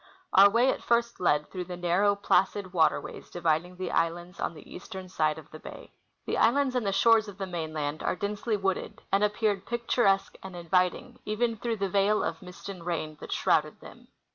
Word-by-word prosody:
Our 200 +1 +8
way 240 +5 +3
at - - -5
first 235 0 +1
led 150 -4 +1
through 180 -2 -4
the 180 0 -7
narrow, 180 +4 +2
placid 195 -1 +1
water 165 -3 +3
ways - - -10
dividing 170 +1 -1
the 185 +1 -4
islands 175 +2 -1
on 170 - -2
the 150 - -13
eastern 185 +1 -9
side 155 -3 0
of 160 - -12
the 155 - -10
bay. - - -11 0.3
The - - -1
islands 265 +3 +3
and 245 -5 -1
the - - +2
shores 220 +2 +4
of 200 -2 -10
the 195 - -3
mainland 155 -4 -4
are - - 0
densely 210 +3 -2
wooded, 195 -1 -3
and 200 +1 +3
appeared 210 -2 0
picturesque 235 -4 +1
and 190 -1 -9
inviting 180 +8 0
even 225 +2 0
through 230 0 -3
the 200 -1 -1
veil 200 +3 +2
of - - -3
mist 180 0 -11
and 190 -4 -7
rain 155 -3 -3
that - - -9
shrouded - - +1
them. - - -14
190 Hz, 200 wpm, -28 LUFS, 175-210 Hz, 0.3 s, Our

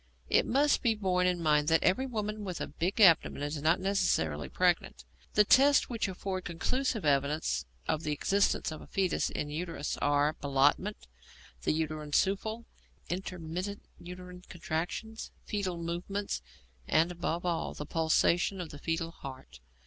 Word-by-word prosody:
It - - +4
must 285 +4 +3
be 230 -4 +2
borne 180 -3 +1
in 175 -2 0
mind 150 -1 +3
that 165 0 +3
every 255 +9 +2
woman 215 -3 -3
with 185 -3 -4
a - - -2
big 185 +6 -3
abdomen 165 -7 +5
is 145 0 -3
not 160 +4 +3
necessarily 80 - 0
pregnant. - - 0 0.3
The 210 - +7
tests 280 +7 +5
which 230 -4 -1
afford 185 0 -4
conclusive 220 - -1
evidence 140 - +1 0.2
of 155 -1 0
the 155 - -2
existence 195 +4 +1
of 155 - -7
a - - -12
foetus 190 -3 0
in 145 - -3
the - - -6
uterus 165 -2 -3
are 145 +1 +2
Ballottement, 145 +9 +1 0.6
the - - +1
uterine 155 -1 -3
souffle, 220 +6 +1 0.4
intermittent 180 +2 -4 0.2
uterine 180 +1 -9
contractions, 175 +7 -4 0.2
foetal 195 -4 -2
movements, 175 - -3 0.5
and, 165 +2 +3
above 175 0 -3
all, 170 -2 -1
the 150 - -6
pulsation 170 +4 +2
of 175 -3 -5
the 145 - -9
foetal 165 +1 -2
heart. 135 - -10
175 Hz, 155 wpm, -31 LUFS, 155-200 Hz, 0.6 s, The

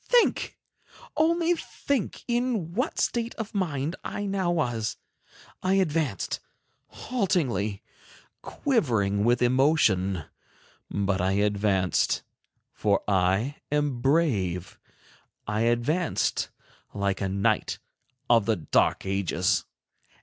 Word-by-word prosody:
Think! 485 -2 +2 0.6
only 335 +2 +3
think 280 - -3
in 240 -8 0
what 250 +7 -1
a - - +1
state 235 0 -1
of 220 -1 -6
mind 160 -5 -1
I 205 - -4
now 195 -3 0
was! 120 -10 -1 0.6
I 185 +1 +2
advanced, 160 - 0 0.5
haltingly, 125 - -1 0.6
quivering 115 - +1
with 120 +2 +3
emotion, 120 - +3 0.7
but 100 -2 0
I 95 +1 +1
advanced, 100 -2 +1 0.5
for 100 -2 +1
I 95 +8 +1
am 145 -4 0
brave—I 105 - -2
advanced 120 +9 +1 0.5
like 100 0 -1
a 95 - 0
knight 100 +1 +1 0.5
of 115 -3 +4
the 110 - +3
dark 85 +2 +1
ages. 95 -2 +1
120 Hz, 100 wpm, -27 LUFS, -, 0.7 s, of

